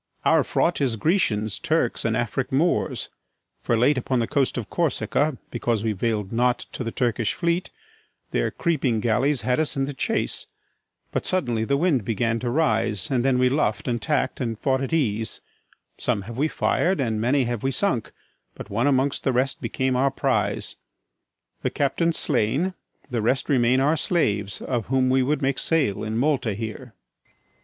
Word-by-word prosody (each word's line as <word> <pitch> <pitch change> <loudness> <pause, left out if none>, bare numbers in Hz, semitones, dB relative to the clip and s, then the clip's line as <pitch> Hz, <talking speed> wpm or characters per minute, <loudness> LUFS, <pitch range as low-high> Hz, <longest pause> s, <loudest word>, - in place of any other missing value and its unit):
Our - - +5
fraught 170 -3 0
is 130 -5 +1
Grecians, 110 - 0
Turks, - - 0
and - - +1
Afric - - -2
Moors; - - +1 0.5
For 115 - +1
late 130 +4 +3
upon 130 +1 -1
the 115 - +1
coast 135 +2 0
of 120 - -3
Corsica, 145 -2 0
Because 120 -2 -1
we 110 - +1
vail'd 105 -1 -1
not 125 +1 +1
to - - -5
the 115 - -3
Turkish 115 -3 0
fleet, 170 +1 0 0.6
Their - - +1
creeping 135 -9 0
galleys 125 +5 +1
had 125 +4 +1
us 155 -2 0
in 135 - +1
the 145 - -5
chase: - - -2 0.6
But - - -2
suddenly 120 -12 0
the 140 +4 +1
wind 145 - +2
began 115 +2 0
to 120 - -2
rise, 115 - +1
And 125 -3 +2
then 135 -1 +3
we 125 0 +4
luff'd 125 -5 0
and 120 -2 -1
tack'd, 150 -2 -1
and 115 -3 -2
fought 130 +2 0
at 135 - -3
ease: 115 -9 0 0.6
Some 110 -6 0
have 115 +3 -8
we 150 - +3
fir'd, 180 +3 +1
and 110 -5 0
many 130 +4 +2
have 120 -2 -2
we 135 - 0
sunk; 135 - -1 0.4
But - - -9
one 115 +7 +1
amongst 135 0 +1
the 135 - +2
rest 130 +2 0
became 130 -1 -1
our 135 +2 +3
prize: 135 - -1 0.8
The - - 0
captain's 165 +4 0
slain; 140 - +1 0.4
the 120 -2 0
rest 130 +7 0
remain 125 -2 +3
our 150 +4 +2
slaves, 105 - 0
Of 120 -5 -2
whom 130 0 +2
we 130 0 +4
would 145 +3 0
make 135 0 +1
sale 150 -12 +1
in 110 +1 -2
Malta 130 -5 +1
here. 110 +2 -7 0.3
FERNEZE. - - -38
125 Hz, 180 wpm, -24 LUFS, 115-140 Hz, 0.8 s, Our